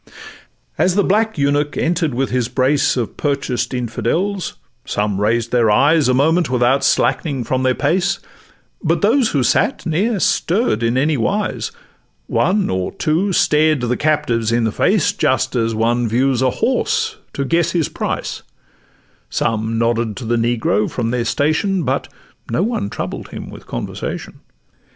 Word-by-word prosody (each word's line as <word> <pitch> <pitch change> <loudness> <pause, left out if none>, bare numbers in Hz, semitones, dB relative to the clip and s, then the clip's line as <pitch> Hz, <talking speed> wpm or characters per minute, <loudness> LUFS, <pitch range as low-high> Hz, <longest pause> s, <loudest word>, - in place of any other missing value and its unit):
As 180 0 +3
the 205 - +3
black 220 +2 +1
eunuch 145 +1 0
enter'd 165 -5 0
with 135 +1 -1
his 125 -2 0
brace 135 +2 +1
Of 120 -3 -3
purchased 140 -5 -1
Infidels, 135 - -2 0.3
some 105 -1 -1
raised 115 +2 +1
their 120 -3 +3
eyes 145 +7 +4
A 125 - +3
moment 160 +4 +2
without 130 +2 +2
slackening 140 -3 +1
from 130 +3 -1
their 130 -1 +2
pace; 185 +6 +1 0.7
But 165 0 +1
those 230 +3 +3
who 140 -4 +1
sate - - +1
ne'er 195 +7 0
stirr'd 180 - +1
in 115 +2 +1
anywise: 155 - 0 0.5
One 200 +1 +1
or 95 0 -2
two 170 +6 0
stared 155 -4 +3
the 125 0 0
captives 145 -7 0
in 120 0 +2
the 110 - +1
face, 195 - +2
Just 130 +1 0
as 115 -2 0
one 120 +2 +1
views 130 +3 +1
a 130 - +3
horse 440 - 0 0.2
to 140 - -2
guess 170 +3 +1
his 165 -4 +1
price; - - -4 0.9
Some 115 0 -1
nodded 115 -1 0
to 125 - -6
the 120 +1 +1
negro 115 -3 +1
from 115 -2 -2
their 125 -1 -1
station, 160 - +1
But 135 0 -1 0.4
no 120 +10 +1
one 220 - -1
troubled - - -5
him - - -8
with - - -12
conversation. - - -5
135 Hz, 155 wpm, -18 LUFS, 120-170 Hz, 0.9 s, eyes